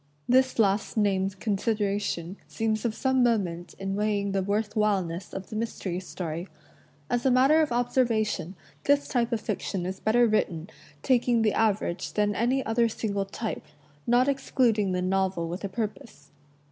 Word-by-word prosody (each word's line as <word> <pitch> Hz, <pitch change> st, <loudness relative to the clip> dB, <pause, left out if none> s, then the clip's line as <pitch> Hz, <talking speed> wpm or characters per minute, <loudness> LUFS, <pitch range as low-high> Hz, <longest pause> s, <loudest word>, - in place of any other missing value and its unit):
This 260 Hz, +1 st, +3 dB
last 205 Hz, 0 st, +1 dB
named 195 Hz, -2 st, +1 dB
consideration 205 Hz, -4 st, -1 dB
seems 220 Hz, 0 st, -1 dB
of 225 Hz, -2 st, 0 dB
some 260 Hz, +1 st, +1 dB
moment 190 Hz, -8 st, 0 dB
in 195 Hz, 0 st, -3 dB
weighing 205 Hz, -1 st, 0 dB
the 195 Hz, 0 st, 0 dB
worth 205 Hz, +2 st, -1 dB
whileness 195 Hz, -5 st, 0 dB
of 195 Hz, -1 st, -7 dB
the -, -, -5 dB
mystery 210 Hz, -5 st, -3 dB
story. 175 Hz, -2 st, -5 dB, 0.6 s
As 245 Hz, 0 st, 0 dB
a 265 Hz, -, +3 dB
matter 265 Hz, +5 st, +5 dB
of 305 Hz, -, 0 dB
observation, 230 Hz, -6 st, 0 dB, 0.3 s
this 285 Hz, 0 st, +3 dB
type 240 Hz, -2 st, 0 dB
of 230 Hz, -, 0 dB
fiction 185 Hz, -3 st, -3 dB
is 185 Hz, +1 st, -4 dB
better 240 Hz, +3 st, +3 dB
written, 180 Hz, -6 st, 0 dB, 0.3 s
taking 240 Hz, -2 st, +3 dB
the 215 Hz, -, +2 dB
average, 205 Hz, -5 st, 0 dB
than 210 Hz, 0 st, +1 dB
any 245 Hz, +6 st, +1 dB
other 230 Hz, +1 st, +2 dB
single 200 Hz, -3 st, -2 dB
type, 215 Hz, +2 st, -5 dB, 0.4 s
not 245 Hz, +2 st, +4 dB
excluding 240 Hz, -7 st, +1 dB
the 180 Hz, 0 st, -1 dB
"novel 185 Hz, -2 st, 0 dB
with 175 Hz, +4 st, -5 dB
a 200 Hz, -, -2 dB
purpose." 205 Hz, -7 st, -6 dB
210 Hz, 160 wpm, -27 LUFS, 190-235 Hz, 0.6 s, matter